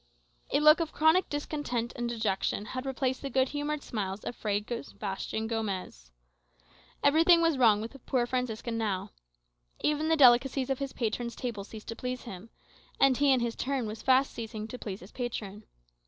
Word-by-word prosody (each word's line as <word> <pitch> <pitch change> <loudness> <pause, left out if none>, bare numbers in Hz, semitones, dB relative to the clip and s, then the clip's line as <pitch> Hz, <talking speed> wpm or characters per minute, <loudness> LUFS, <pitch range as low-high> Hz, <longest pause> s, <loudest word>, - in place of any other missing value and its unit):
A - - +3
look 305 +2 +7
of 330 -2 -2
chronic 320 +4 +3
discontent 290 -5 -3
and 240 0 -2
dejection 210 -3 -1
had 255 +5 -5
replaced 260 -1 -1
the 275 - -4
good 260 0 +2
humoured 295 0 -3
smiles 200 -2 -4
of 240 - -5
Fray 205 -1 -1
Sebastian 220 -2 -4
Gomez. 195 - -4 0.9
Everything 325 +4 +6
was 330 -2 +3
wrong 215 -4 +5
with 225 - -5
the 275 - -13
poor 245 0 0
Franciscan 235 -2 -2
now. 200 -4 -2 0.7
Even 300 +1 +1
the 325 - +4
delicacies 265 0 +5
of 270 - -1
his 275 -1 -3
patron's 235 +1 -2
table 230 -6 -4
ceased 215 +1 -11
to 230 - -4
please 250 +1 -4
him; 210 -2 -9 0.5
and 270 -2 +5
he, 285 -1 +4
in 260 -2 +3
his 235 -1 -1
turn, 270 -2 -1
was 215 0 -6
fast 265 +1 +3
ceasing 220 -2 -6
to 250 - -7
please 195 -2 -6
his 185 - -12
patron. 215 -4 -5
240 Hz, 180 wpm, -29 LUFS, 220-275 Hz, 0.9 s, look